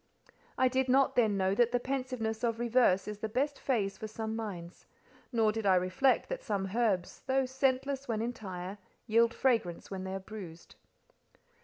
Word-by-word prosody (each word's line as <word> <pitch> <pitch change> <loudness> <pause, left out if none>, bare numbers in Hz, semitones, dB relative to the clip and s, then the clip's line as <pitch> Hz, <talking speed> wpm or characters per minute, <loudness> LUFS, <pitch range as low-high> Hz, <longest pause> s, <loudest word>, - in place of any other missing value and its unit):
I 260 - +4
did 260 0 0
not 270 +1 +4
then 220 -5 +3
know 190 0 +2
that 240 +3 +3
the 245 - +2
pensiveness 255 -4 -3
of 230 -1 +1
reverse 235 -5 +3
is 210 -1 -5
the 220 - -3
best 280 +6 -1
phase 200 -7 -1
for 220 - -4
some 220 0 -4
minds; 185 -6 -7 0.4
nor 225 -3 +3
did 220 -1 -2
I 190 - +6
reflect 185 +9 +2
that - - -3
some 200 -4 -2
herbs, 205 -7 0
"though 265 0 +2
scentless 265 +1 0
when 225 -3 -1
entire, 200 -5 -5 0.3
yield 230 +1 +4
fragrance 230 -11 0
when 190 -1 -4
they're 190 0 -3
bruised." 190 -5 -10
225 Hz, 170 wpm, -31 LUFS, 195-255 Hz, 0.4 s, I